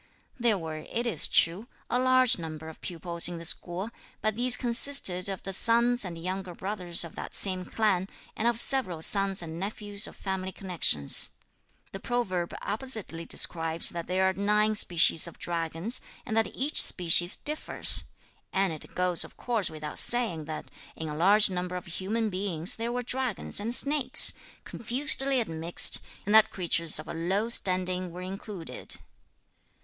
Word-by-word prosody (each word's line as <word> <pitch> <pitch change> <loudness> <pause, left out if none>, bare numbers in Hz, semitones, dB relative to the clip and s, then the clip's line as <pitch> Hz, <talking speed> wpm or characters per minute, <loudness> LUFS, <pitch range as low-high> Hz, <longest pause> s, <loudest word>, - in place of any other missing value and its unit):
There 235 -3 +1
were, 160 -3 -7
it 230 +9 -5
is 235 - +5
true, 180 +8 +1 0.2
a 245 - -1
large 255 -4 +3
number 160 -1 -8
of 160 - -15
pupils 170 -1 -2
in 175 -1 -6
this 165 0 0
school, 185 +6 -3 0.3
but 215 -1 -2
these 245 +2 +4
consisted 235 -7 +4
of 190 -2 -7
the 195 - -6
sons 235 +4 +2
and 175 -3 -8
younger 185 +1 -6
brothers 185 -3 0
of 165 - -10
that - - -6
same 185 -2 0
clan, 195 -3 -1 0.3
and 225 - -2
of 235 -1 0
several 185 -13 -1
sons 195 -1 +3
and 165 0 -8
nephews 205 +1 -3
of - - -13
family 190 -1 -5
connections. 170 - +2 0.6
The 195 - -8
proverb 190 -7 -3
appositely 215 -8 -2
describes 165 -1 0
that 170 -1 -7
there 190 +1 0
are 190 - 0
nine 210 +2 0
species 170 -5 +3
of 170 - -12
dragons, 170 +6 -3 0.2
and 220 - -5
that 225 0 +1
each 280 +4 +1
species 175 0 +5
differs; 305 +1 +5 0.5
and 190 -3 -1
it 155 - -12
goes 180 -1 +2
of - - -14
course 230 -6 -2
without 155 -1 -6
saying 225 -11 0
that 155 0 -8 0.2
in 160 -1 -7
a 150 - -6
large 195 +5 +3
number 180 0 -5
of 180 - -7
human 210 +6 -4
beings 185 -3 -2
there 230 +1 -5
were 245 0 -4
dragons 250 -6 -2
and 230 +4 +1
snakes, 280 -2 +4 0.3
confusedly 270 +2 0
admixed, 165 -5 +2 0.2
and 205 - -2
that 220 0 +6
creatures 170 -3 +1
of 155 +1 -6
a - - -7
low 190 +7 -2
standing 185 -4 +1
were 180 +2 -10
included. 190 -1 -5
190 Hz, 165 wpm, -27 LUFS, 170-225 Hz, 0.6 s, that